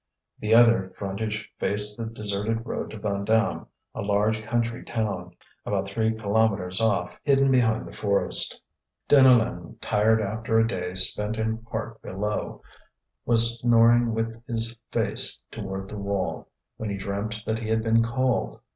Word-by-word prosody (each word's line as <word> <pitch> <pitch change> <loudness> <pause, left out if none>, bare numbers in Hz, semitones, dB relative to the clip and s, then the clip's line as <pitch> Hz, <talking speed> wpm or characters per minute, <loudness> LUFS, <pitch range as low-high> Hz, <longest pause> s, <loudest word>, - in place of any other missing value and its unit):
The 110 +1 +2
other 115 -5 +4
frontage 105 +2 -4
faced 105 +1 +1
the 115 0 -5
deserted 110 +1 -3
road - - -4
to - - -9
Vandame, 105 +2 -1 0.3
a - - -5
large 105 +2 0
country 115 +1 -2
town, 95 -6 -4 0.3
about 100 -1 -2
three 110 +2 0
kilometres 105 -3 0
off, 105 -6 0
hidden 135 -1 +3
behind 115 -4 +2
the - - -10
forest. 100 -1 -1 0.5
Deneulin, 125 - +3
tired 110 +2 +2
after 110 +2 -1
a 115 - +4
day 90 -5 -4
spent 105 +3 +5
in 110 0 -2
part 115 0 -7
below, 105 +3 -4 0.6
was 115 0 +7
snoring 120 0 +4
with 115 0 -4
his 115 -1 -3 0.2
face - - 0
toward 95 0 -6
the 105 +1 -7
wall, 100 -1 -3 0.3
when 110 - -5
he 100 - -3
dreamt 100 +3 -4
that 110 0 -2
he 110 -1 -5
had 110 0 +1
been 115 0 +3
called. 130 +1 -1
110 Hz, 145 wpm, -25 LUFS, 100-115 Hz, 0.6 s, was